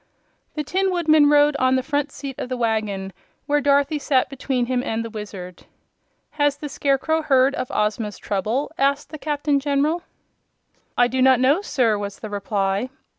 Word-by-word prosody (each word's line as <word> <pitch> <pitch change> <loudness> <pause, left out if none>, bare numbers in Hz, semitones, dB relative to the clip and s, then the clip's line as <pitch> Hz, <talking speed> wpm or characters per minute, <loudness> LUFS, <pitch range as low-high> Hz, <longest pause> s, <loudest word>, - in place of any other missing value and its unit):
The 300 - -2
Tin 380 +6 0
Woodman 310 -4 +4
rode 295 0 +4
on 255 -1 +3
the 260 - 0
front 285 +1 -1
seat 270 -1 -7
of - - -4
the 255 - -3
wagon, 215 -5 -2 0.3
where 295 0 +1
Dorothy 285 +2 +2
sat 270 -2 +1
between 265 -2 -1
him 250 0 0
and 225 -2 -3
the 230 - -7
Wizard. 195 -5 -8 0.6
"Has 290 -1 +1
the 295 0 -6
Scarecrow 285 +3 0
heard 270 -3 +3
of 255 - -4
Ozma's 210 0 -1
trouble?" 215 +8 -2
asked 275 +2 +1
the 310 - -7
Captain 290 -1 0
General. 290 +4 0 1.0
"I 245 - +5
do 260 +2 -1
not 260 -1 +5
know, 280 +8 +3
sir," 230 - +1
was 200 -1 -5
the 215 - -8
reply. 200 +2 -1
265 Hz, 175 wpm, -22 LUFS, 220-290 Hz, 1.0 s, I